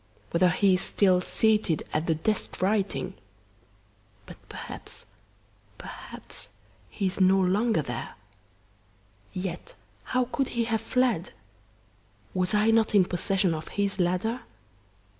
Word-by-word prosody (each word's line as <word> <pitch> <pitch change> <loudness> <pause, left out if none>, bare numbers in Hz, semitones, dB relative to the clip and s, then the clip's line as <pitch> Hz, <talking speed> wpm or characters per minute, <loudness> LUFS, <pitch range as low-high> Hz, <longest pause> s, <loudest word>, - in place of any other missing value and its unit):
whether 180 +2 +4
he 195 +3 +3
is 180 - +2
still 185 -3 +3
seated 210 -5 +2
at 155 +2 0
the 165 - +3
desk 210 +7 -2
writing! 200 +1 0 1.1
But - - -11
perhaps - - -9 0.7
perhaps - - -8 0.4
he 200 - -3
is 190 +1 0
no 190 +1 +5
longer 195 0 +2
there! 120 -3 -5 1.2
Yet 185 - -5 0.3
how 255 0 +1
could 275 - 0
he 235 - +3
have 225 -1 0
fled? 225 -7 +1 1.0
Was 185 +3 +1
I 215 +2 +4
not 225 -1 +3
in 190 -3 +6
possession 185 0 +1
of 155 -1 -5
his 200 -1 -1
ladder? 185 +8 0
195 Hz, 120 wpm, -27 LUFS, 180-220 Hz, 1.2 s, in